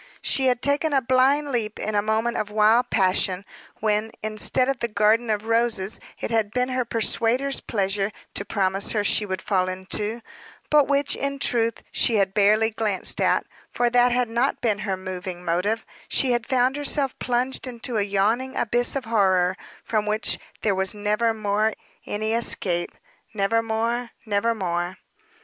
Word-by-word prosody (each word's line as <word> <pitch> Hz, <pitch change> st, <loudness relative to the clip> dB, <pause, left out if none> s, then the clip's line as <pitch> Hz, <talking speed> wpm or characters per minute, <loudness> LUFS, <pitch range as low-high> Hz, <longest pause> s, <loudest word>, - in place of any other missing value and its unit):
She 265 Hz, -1 st, +2 dB
had 250 Hz, -1 st, +1 dB
taken 285 Hz, +2 st, +1 dB
a 275 Hz, -, +5 dB
blind 270 Hz, +4 st, +3 dB
leap 220 Hz, -4 st, -2 dB
in 215 Hz, -, -3 dB
a 205 Hz, -, +2 dB
moment 220 Hz, +3 st, 0 dB
of 210 Hz, -, -2 dB
wild 215 Hz, +3 st, +3 dB
passion, 185 Hz, -1 st, +1 dB, 0.4 s
when, 215 Hz, 0 st, +1 dB
instead 215 Hz, +4 st, +1 dB
of 270 Hz, -2 st, -1 dB
the 235 Hz, -, -1 dB
garden 215 Hz, +2 st, +2 dB
of 210 Hz, 0 st, -1 dB
roses 225 Hz, -3 st, +1 dB, 0.2 s
it -, -, -4 dB
had 220 Hz, -2 st, +1 dB
been 250 Hz, +3 st, -1 dB
her 255 Hz, 0 st, 0 dB
persuader's 235 Hz, +4 st, +1 dB
pleasure 195 Hz, -1 st, -1 dB, 0.2 s
to -, -, -2 dB
promise 195 Hz, -1 st, 0 dB
her 210 Hz, -2 st, +1 dB
she 210 Hz, +1 st, +2 dB
would 190 Hz, -2 st, -4 dB
fall 185 Hz, -2 st, +1 dB
into, 205 Hz, +5 st, -2 dB, 0.5 s
but 295 Hz, -2 st, +5 dB
which, 280 Hz, 0 st, +1 dB
in 280 Hz, 0 st, -2 dB
truth, 230 Hz, -4 st, 0 dB
she 230 Hz, -, +2 dB
had 195 Hz, -2 st, +2 dB
barely 215 Hz, +2 st, +3 dB
glanced 210 Hz, -3 st, 0 dB
at, -, -, +2 dB, 0.2 s
for 240 Hz, -1 st, 0 dB
that 245 Hz, 0 st, +4 dB
had 245 Hz, 0 st, +1 dB
not 240 Hz, +4 st, 0 dB
been 215 Hz, -3 st, 0 dB
her 195 Hz, -2 st, -2 dB
moving 185 Hz, -1 st, -6 dB
motive, 200 Hz, +7 st, 0 dB, 0.2 s
she 260 Hz, -, +1 dB
had 240 Hz, -1 st, 0 dB
found 260 Hz, +1 st, +2 dB
herself 285 Hz, -2 st, +1 dB
plunged 250 Hz, +2 st, -1 dB
into 240 Hz, -1 st, -4 dB
a -, -, +2 dB
yawning 210 Hz, +6 st, 0 dB
abyss 240 Hz, +3 st, +1 dB
of 270 Hz, -2 st, -2 dB
horror, 190 Hz, -5 st, +2 dB, 0.3 s
from 215 Hz, -2 st, -1 dB
which 215 Hz, +1 st, 0 dB, 0.2 s
there 210 Hz, -, +2 dB
was 190 Hz, +1 st, 0 dB
never 210 Hz, +2 st, +1 dB
more 215 Hz, 0 st, 0 dB, 0.3 s
any 215 Hz, +2 st, -2 dB
escape 180 Hz, -6 st, -1 dB, 0.5 s
never 215 Hz, +3 st, +2 dB
more, 230 Hz, +2 st, -1 dB, 0.2 s
never 220 Hz, +2 st, +1 dB
more. 175 Hz, -2 st, -2 dB
220 Hz, 170 wpm, -24 LUFS, 200-245 Hz, 0.5 s, a